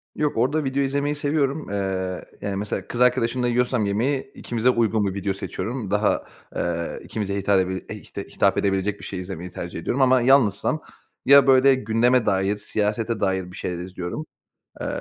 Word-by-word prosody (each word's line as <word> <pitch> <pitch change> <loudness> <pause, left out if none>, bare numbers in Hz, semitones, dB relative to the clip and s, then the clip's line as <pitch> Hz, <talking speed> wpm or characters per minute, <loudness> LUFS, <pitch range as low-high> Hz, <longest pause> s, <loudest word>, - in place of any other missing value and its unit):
Yok, 150 -5 -1
orada 145 +6 +1
video 135 +1 0
izlemeyi 140 +2 0
seviyorum. 145 -2 -1
Eee, 95 -2 -2 0.2
yani, 100 -1 -3
mesela 100 -1 -3
kız 120 - -4
arkadaşımla 125 0 +2
yiyorsam 120 -2 +1
yemeği, 125 +8 -1
ikimize 120 +1 0
uygun 110 -3 +2
bir 95 - -2
video 100 0 -2
seçiyorum. 105 +3 -5
Daha, 105 +1 +1 0.3
eee, 85 -1 -2
ikimize 100 -2 -3
hitap 100 0 +2
edeb 95 0 0 0.3
işte, - - -7
hitap - - +1
edebilecek 100 +1 0
bir - - -12
şey 95 - -5
izlemeyi 90 -1 -6
tercih 85 -2 -6
ediyorum. 130 +10 -1
Ama 130 -1 +5
yalnızsam 130 +2 +3 0.4
ya 140 0 +7
böyle 135 +1 +6
gündeme 120 +1 +2
dair, 95 +1 +1
siyasete 105 +2 -1
dair 95 -2 -1
bir - - -11
şeyler 90 -1 -3
izliyorum. 95 - -5 0.6
Eee, - - -3
110 Hz, 170 wpm, -23 LUFS, 95-130 Hz, 0.6 s, ya